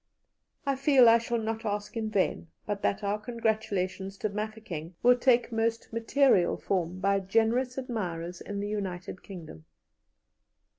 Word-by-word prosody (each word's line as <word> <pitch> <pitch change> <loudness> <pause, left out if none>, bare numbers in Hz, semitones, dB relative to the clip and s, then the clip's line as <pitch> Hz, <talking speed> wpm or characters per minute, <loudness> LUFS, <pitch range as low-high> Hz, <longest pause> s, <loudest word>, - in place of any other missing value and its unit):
"I 275 -1 +1
feel 270 -3 +6
I 230 0 +7
shall 235 +1 -2
not 225 0 -3
ask 205 0 -3
in 220 -1 -2
vain, 195 -4 0 0.2
but 205 -1 -3
that 200 +1 0
our 205 +1 0
congratulations 210 -4 -2
to 215 - -1
Mafeking 205 -6 -5
will 245 +1 +7
take 245 -1 +3
most 225 0 -1
material 230 -4 +3
form 180 -2 -2
by 195 +1 +2
generous 225 +6 +1
admirers 180 -9 -4
in 205 0 -5
the 205 - -2
United 190 -3 -4
Kingdom. 160 - -10
215 Hz, 145 wpm, -29 LUFS, 190-230 Hz, 0.2 s, I